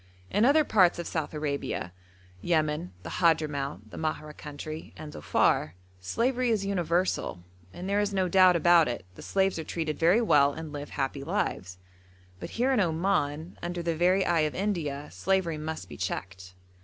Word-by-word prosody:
In 210 +4 +3
other 300 +4 +5
parts 185 -10 +4
of 170 - -4
South 160 -3 -3
Arabia 145 - -3 0.5
Yemen, 150 - 0
the - - -7
Hadhramout, 150 -4 0
the - - -9
Mahra 155 -1 -3
country, 155 +2 -8
and 155 -1 -8
Dhofar 75 +1 +1 0.3
slavery 240 - 0
is 215 -4 +1
universal; 175 - -1 0.3
and 180 - -7
there 200 +1 +1
is 205 0 0
no 190 -2 +1
doubt 185 0 +6
about 170 -1 +5
it 120 -6 -4
the - - -12
slaves 190 -3 0
are - - -3
treated 155 -1 -3
very 175 +7 +5
well 145 -11 +4
and 160 -1 -7
live 145 0 -6
happy 135 0 -3
lives; 115 - -2 0.6
but - - -6
here 255 +3 +2
in 250 - +2
Oman, 165 -2 0
under 175 0 -4
the 170 -1 0
very 185 +3 +3
eye 170 - +2
of 155 -1 0
India, 155 -8 -2
slavery 190 -5 0
must 155 +1 -5
be - - -10
checked. 95 -1 -5
165 Hz, 170 wpm, -28 LUFS, 150-190 Hz, 0.6 s, doubt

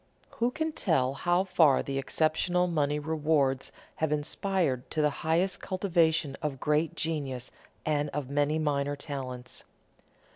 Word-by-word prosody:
Who 235 +1 +2
can 315 +5 -2
tell 145 - +1
how 175 +5 +1
far 170 -7 +4
the 135 0 -2
exceptional 160 +5 +1
money 150 -4 +1
rewards 150 -3 +1 0.3
have 160 -1 0
inspired 150 -2 0
to 155 - -3
the 150 - +3
highest 170 +4 +1
cultivation 165 -6 +1
of 145 -4 -3
great 155 +3 +1
genius 140 -7 -3 0.3
and 150 -1 +1
of 145 -2 -4
many 145 +2 +1
minor 145 -2 0
talents? 130 -4 -6
150 Hz, 135 wpm, -29 LUFS, 140-170 Hz, 0.3 s, far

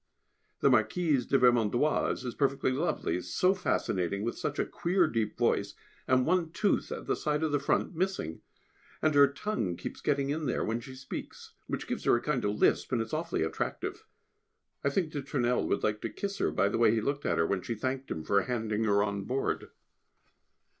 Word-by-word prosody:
The - - +5
Marquise 125 +4 +2
de 135 - +4
Vermondoise 125 +2 +2
is 120 - -3
perfectly 135 -2 +1
lovely, 130 - -1
so 90 - +2
fascinating, 100 - -1
with 120 - -2
such - - -3
a - - +1
queer 180 +1 +1
deep 115 -8 -1
voice, - - +1 0.3
and 130 -1 +3
one 175 -1 +2
tooth 200 +5 0
at - - -5
the - - +1
side 150 0 -1
of 160 - +1
the 145 - +2
front 140 +5 0
missing; 175 - -2 0.6
and 155 -1 +3
her 140 0 +7
tongue 140 - -2
keeps - - -7
getting 140 -1 +1
in 155 0 -2
there 125 - 0
when 115 +2 -1
she 130 +2 -10
speaks, 130 0 -8
which - - -3
gives - - -4
her - - +5
a - - +1
kind 135 -2 -1
of 105 0 0
lisp, - - +2
and 125 - +1
it 115 - 0
is 110 - -14
awfully 155 - -1
attractive. 80 - -3 0.8
I 140 - +3
think 155 +2 0
de 145 - -3
Tournelle 125 -3 0
would - - 0
like 105 0 0
to 115 - -2
kiss 200 - -4
her, - - +2
by 90 +6 +2
the 105 - -1
way 115 - +6
he - - +2
looked 140 +6 -2
at 85 - +1
her 80 - +3
when 95 +2 0
she 115 - -4
thanked 130 +4 -3
him 80 - -4
for 100 +3 +3
handing 110 -2 -1
her 100 -1 +3
on 100 -1 -2
board. 130 +4 -2
130 Hz, 210 wpm, -30 LUFS, 105-150 Hz, 0.8 s, her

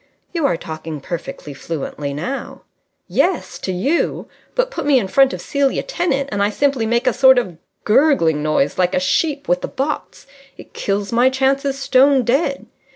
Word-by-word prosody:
"You 330 -5 +1
are 170 - 0
talking 160 -1 -7
perfectly 150 -1 -7
fluently 145 0 -5
now." 210 - -5 0.4
"Yes, - - 0
to 190 - -3
you. 270 - -1 0.3
But - - 0
put - - -4
me 285 -2 +5
in 225 - 0
front 270 +6 +4
of - - -6
Celia 280 -1 0
Tennant, 345 - -1
and 200 -1 -1
I 200 - +3
simply 265 0 0
make 235 +1 +1
a 255 - +3
sort 260 +1 +6
of 185 -9 -2 0.2
gurgling 210 - +3
noise 150 0 0
like 180 0 +2
a - - +3
sheep 280 - 0
with 175 +1 +1
the - - -3
botts. 280 +3 -4 0.3
It - - -14
kills 200 0 -2
my 240 +2 +4
chances 270 +1 0
stone 275 0 +4
dead. 275 +4 0
250 Hz, 175 wpm, -19 LUFS, 180-275 Hz, 0.4 s, sort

